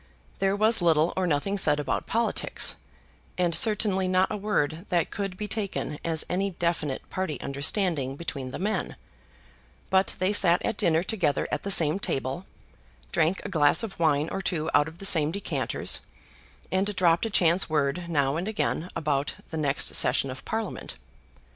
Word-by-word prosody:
There 195 0 +2
was 215 0 +3
little 165 -1 +3
or 185 -1 0
nothing 175 +6 0
said 150 -4 +2
about 145 - -2
politics, 230 +1 0 0.6
and 175 -2 +1
certainly 210 -3 +2
not 185 +1 +2
a - - -1
word 190 -5 -1
that 175 -3 +1
could 195 -2 -4
be 210 - -4
taken 200 -8 -3
as 160 -2 0
any 195 +2 0
definite 170 -6 -2
party 180 -7 -3
understanding 140 -1 0
between 140 -5 -5
the - - -6
men; 205 0 -2 1.0
but 190 0 +3
they 185 +3 +1
sat 180 -3 +5
at - - -1
dinner 165 0 +2
together 185 -7 0
at - - -1
the 200 - -4
same 165 -1 +3
table, 135 +1 -3 0.6
drank 165 +4 +1
a - - -3
glass 155 +2 +3
of 210 -6 -6
wine 155 -2 +2
or 195 - -3
two 165 -4 -2
out 145 +1 +4
of 160 +1 -10
the 195 - -7
same 155 -5 +3
decanters, 200 +3 -2 0.7
and 195 +2 0
dropped 175 +3 +3
a - - -5
chance 175 -3 +3
word 155 +3 0
now 145 -2 +1
and 175 +4 -3
again 205 -5 -1
about 145 -2 -1 0.2
the 160 - -3
next 145 -2 +1
session 135 - +3
of 130 - -9
Parliament. 220 - -3
175 Hz, 170 wpm, -27 LUFS, 150-195 Hz, 1.0 s, sat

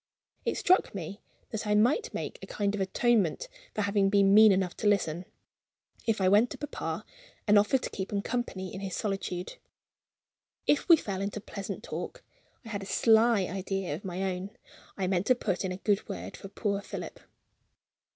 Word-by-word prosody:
It - - 0
struck 370 - +3
me 195 +2 -6 0.3
that 220 -1 -3
I 210 - +3
might 255 - +3
make - - -5
a - - -8
kind 200 -1 -1
of 205 - -2
atonement 215 - +1 0.3
for 215 - 0
having 200 -1 +2
been 200 -1 +4
mean 215 0 +9
enough 185 -2 +1
to 210 - 0
listen, 180 -4 +1 0.8
if 225 -2 +2
I 190 - +3
went 210 +5 +5
to - - -7
papa, 295 -1 -4 0.4
and 210 0 +7
offered 230 +6 +2
to - - -2
keep 190 -1 -5
him 200 -1 -1
company 210 -6 -3
in 190 - -5
his 195 -2 -4
solitude. 195 -3 -3 1.1
If 295 - +2
we 335 - +11
fell 195 -8 -4
into 200 +1 -3
pleasant 200 -1 -6
talk, - - -6 0.4
I - - -8
had 205 -2 -3
a - - -6
sly 225 0 +4
idea 190 -2 -2
of 160 - -6
my 185 0 -3
own 180 +2 -5 0.5
I 195 - 0
meant 185 +1 0
to 255 - +5
put 195 -6 -2
in 190 - -2
a 180 - -4
good 200 +1 0
word 90 +2 -6
for - - -9
poor 200 0 -2
Philip. - - -7
200 Hz, 190 wpm, -29 LUFS, 190-215 Hz, 1.1 s, we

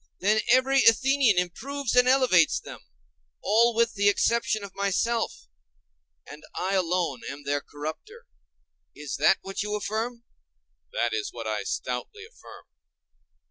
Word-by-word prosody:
Then 215 +3 +2
every 265 +1 +4
Athenian 260 -2 +4
improves 250 +9 -2
and 250 0 +5
elevates 255 - +4
them; - - -11 0.6
all 230 +2 +3
with 235 0 +2
the 205 0 +3
exception 220 +1 0
of 200 -2 -9
myself; 210 +4 -1 0.8
and 150 +1 -12
I 190 +2 -2
alone 175 -7 -1
am 140 +1 -8
their 145 0 -1
corrupter? 155 - -8 0.7
Is 150 -2 -6
that 155 +6 +4
what 195 0 -5
you 210 +1 -3
affirm? 220 +4 -4 0.7
That 120 -1 -1
is 110 -1 -3
what 115 -2 -8
I 110 -1 -2
stoutly 130 - -5
affirm. 460 - -15
205 Hz, 135 wpm, -26 LUFS, 160-240 Hz, 0.8 s, and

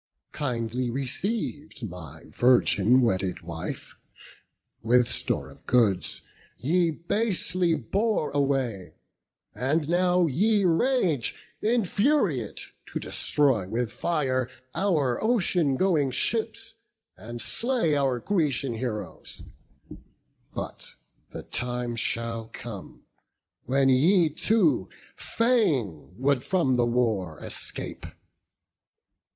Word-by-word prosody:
Kindly 125 -3 -2
receiv'd, 145 - -3
my 85 -4 -10
virgin 125 -1 +4
wedded 95 -5 0
wife, 85 -1 -6 0.9
With 120 +1 +4
store - - -1
of - - -19
goods, 110 -7 +2 0.3
ye 170 +5 +2
basely 180 0 0
bore 195 - -1
away; 135 -9 -1 0.6
And 145 +6 0
now 180 +1 +3
ye 200 +7 +2
rage, 175 - +2 0.3
infuriate, 210 - +1 0.3
to - - -4
destroy 130 -11 +1
With 115 0 -2
fire 130 -6 -1 0.2
our 155 - +1
ocean 180 - +2
going 160 -7 +2
ships, 125 - -1 0.4
and 120 +2 -8
slay 230 - +1
Our 135 -3 +1
Grecian 145 - 0
heroes; 115 -2 -5 1.1
but - - -5 0.3
the - - -8
time 120 -1 -2
shall 115 -1 -2
come 110 -6 -9 0.6
When 135 +1 +2
ye 160 +7 +4
too 155 - +2 0.3
fain 145 - 0
would 135 0 +1
from 165 -9 +1
the 120 -1 +2
war 110 -10 0
escape. - - -2
135 Hz, 95 wpm, -26 LUFS, 120-175 Hz, 1.1 s, virgin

